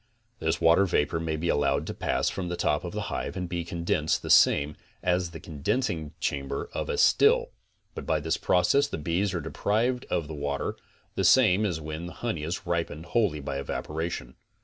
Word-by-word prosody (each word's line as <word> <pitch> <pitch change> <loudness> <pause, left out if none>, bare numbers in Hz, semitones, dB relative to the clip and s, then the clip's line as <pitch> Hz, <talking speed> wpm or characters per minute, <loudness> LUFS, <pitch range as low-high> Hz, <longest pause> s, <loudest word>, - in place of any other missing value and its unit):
This 80 0 0
water 85 +4 +5
vapor 80 -1 +1
may 80 -1 -2
be 80 +3 -3
allowed 70 -1 +1
to - - -4
pass - - -1
from 90 -2 -2
the 90 - -2
top 75 -3 0
of - - -5
the - - -3
hive - - -3
and 90 -1 -3
be 85 -1 -3
condensed 85 -2 -1
the - - -1
same 75 +1 +5 0.3
as 90 0 +1
in 85 - -15
the 80 - -7
condensing 80 - -2
chamber 70 -1 -3
of - - -3
a - - -1
still, - - +4 0.4
but - - -7
by 80 -1 +2
this 80 +2 0
process 140 +11 +3
the - - -4
bees 85 +6 0
are 85 - -1
deprived 115 - 0
of 80 - -1
the 80 - -6
water 70 -1 -2 0.4
the 95 - -1
same 105 0 +5
as 85 -5 -2
when 80 +2 -5
the 90 - -8
honey 115 -10 -3
is 85 +4 -4
ripened 85 -2 -2
wholly 100 -11 +2
by 70 -1 -3
evaporation. 80 -1 -4
85 Hz, 200 wpm, -27 LUFS, 75-90 Hz, 0.4 s, water